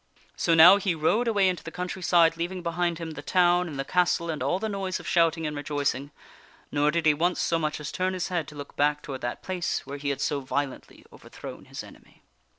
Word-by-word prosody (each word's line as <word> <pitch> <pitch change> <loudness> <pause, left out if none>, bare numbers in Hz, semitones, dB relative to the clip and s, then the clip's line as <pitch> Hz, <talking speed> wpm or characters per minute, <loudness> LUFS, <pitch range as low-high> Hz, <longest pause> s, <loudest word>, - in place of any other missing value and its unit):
So 165 - +2
now 175 +5 +9
he 190 -4 0
rode 205 +10 +1
away 205 -4 +3
into 180 -1 -1
the - - -6
country 180 +2 -5
side, 170 -2 +4
leaving 175 +2 -4
behind 170 0 -1
him 165 -1 -6
the 150 -2 -7
town 175 +2 +3
and 150 -4 -7
the 135 - -3
castle 175 -1 +1
and 155 - -5
all 140 +7 +1
the 220 +3 -3
noise 195 -3 -3
of - - -10
shouting 165 -2 +2
and 150 -1 -3
rejoicing; 145 -1 -2 0.6
nor 145 0 +2
did 165 +1 0
he 155 - +6
once 175 +4 0
so 165 - +1
much 155 -1 -2
as 150 - -5
turn 185 0 -1
his 180 0 -3
head 170 -5 -2
to 150 - -11
look 145 -1 -9
back 150 +1 +1
toward 135 -2 -6
that 120 0 -4
place 185 -2 -2
where 140 +1 -6
he 140 0 -2
had 140 -1 -2
so 145 0 0
violently 140 0 -4
overthrown - - -10
his - - -8
enemy. - - -17
165 Hz, 235 wpm, -26 LUFS, 145-180 Hz, 0.6 s, now